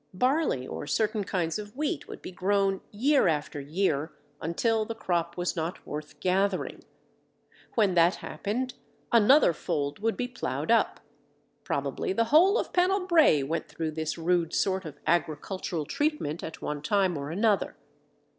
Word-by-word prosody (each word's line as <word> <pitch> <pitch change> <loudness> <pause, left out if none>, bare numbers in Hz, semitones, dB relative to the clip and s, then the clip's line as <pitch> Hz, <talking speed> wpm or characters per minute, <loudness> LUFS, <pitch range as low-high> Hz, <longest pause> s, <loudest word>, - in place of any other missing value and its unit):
Barley 255 - +1
or 145 - -6
certain 215 +2 0
kinds 175 -2 -1
of 210 +1 -9
wheat 300 0 -2
would - - -10
be - - -6
grown 195 +1 +1
year 270 +4 +3
after 150 -2 -1
year 155 0 -1 0.3
until 220 +8 +1
the 225 +1 -5
crop 170 -4 -1
was 175 0 -1
not 165 +1 -4
worth 150 0 -7
gathering. 190 +1 0 0.9
When 205 -5 +3
that 170 +1 +4
happened, 250 +5 -3 0.4
another 235 - +6
fold 145 -2 -2
would 225 +2 0
be 250 - -1
ploughed 250 - -3
up. - - +2 0.6
Probably 380 - -2
the 230 - +2
whole 375 +7 +6
of - - -3
Pennell 365 +1 +2
Brae 320 - +5
went 160 +5 -2
through 160 -1 -4
this 160 +1 -3
rude 170 0 +1
sort 190 -1 +1
of 150 -2 -8
agricultural 160 +1 -1
treatment 290 - -1
at 160 - -7
one 150 -1 -3
time 190 +1 +1
or 140 -1 -4
another. 205 +4 +1
185 Hz, 155 wpm, -28 LUFS, 160-225 Hz, 0.9 s, another